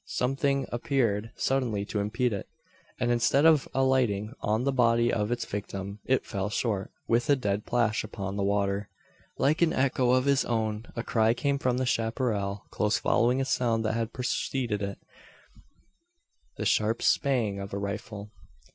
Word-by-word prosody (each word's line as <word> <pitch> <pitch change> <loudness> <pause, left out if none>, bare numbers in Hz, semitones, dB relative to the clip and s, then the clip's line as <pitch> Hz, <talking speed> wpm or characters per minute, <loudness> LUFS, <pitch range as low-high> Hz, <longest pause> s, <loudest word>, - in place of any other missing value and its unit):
Something 135 +1 0
appeared 115 -4 0
suddenly 120 -7 0
to 105 - -3
impede 115 +4 0
it; 100 - -5 0.5
and 120 -1 +1
instead 120 +5 +3
of 160 -4 +5
alighting 125 -5 +1
on 110 +2 0
the 140 - +1
body 120 -2 +3
of 105 0 0
its 120 - -1
victim, 100 0 -5
it 130 0 +1
fell 100 -1 -3
short, 105 -3 -1 0.2
with 120 +3 +1
a 145 - +6
dead 105 -5 -2
plash 115 -3 +1
upon 100 -2 -5
the 100 - -2
water! 100 0 0 0.5
Like 150 +5 +2
an 170 -2 +4
echo 130 -1 +1
of 130 +1 +3
his 140 -1 +3
own, 110 -1 -2
a 115 - -3
cry 110 0 +2
came 140 +2 0
from 125 -2 0
the 130 - 0
chapparal, 110 -4 -1
close 105 0 +1
following 125 +3 +2
a - - 0
sound 115 -4 0
that 110 - +1
had 115 0 -2
preceded 125 -3 -2
it 100 0 -3 1.6
the - - -3
sharp 110 +2 +1
"spang" 120 -8 +2
of 100 0 -6
a 100 - -3
rifle. 100 +1 -5
115 Hz, 165 wpm, -28 LUFS, 105-130 Hz, 1.6 s, a